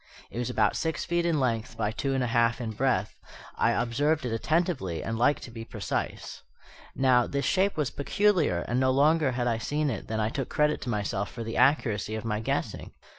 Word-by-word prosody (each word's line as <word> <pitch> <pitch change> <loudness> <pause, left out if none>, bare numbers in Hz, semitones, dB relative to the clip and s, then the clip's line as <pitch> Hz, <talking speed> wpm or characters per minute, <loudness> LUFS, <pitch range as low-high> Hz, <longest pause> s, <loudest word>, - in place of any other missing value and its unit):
It 120 - -5
was 120 - -2
about 105 -2 +2
six 160 -1 -2
feet 170 0 0
in 160 -3 +1
length 115 -1 -1
by 105 - 0
two 135 +4 -2
and 130 - +1
a 120 -1 -2
half 115 0 +3
in 115 -3 -3
breadth: 110 -3 0 0.4
I - - +2
observed 140 +5 +1
it 120 - -2
attentively 140 - 0
and 115 - -3
like 125 +6 +3
to 120 - -9
be 115 -1 -7
precise. - - -4 0.5
Now, 130 -2 +4
this 140 0 -2
shape 195 -1 +2
was 150 -6 0
peculiar; 170 - +1
and 120 +2 -1
no 130 0 +3
sooner 150 -1 +3
had 120 0 -1
I 115 -2 0
seen 145 +4 -1
it 110 - -5
than 110 0 -2
I 110 0 +1
took 135 +1 -4
credit 150 0 +1
to 125 - -5
myself 100 -2 -2
for 115 - -6
the 115 +1 -5
accuracy 110 -7 +2
of 110 - -5
my 105 -2 -1
guessing. 110 - -3
125 Hz, 215 wpm, -28 LUFS, 115-145 Hz, 0.5 s, Now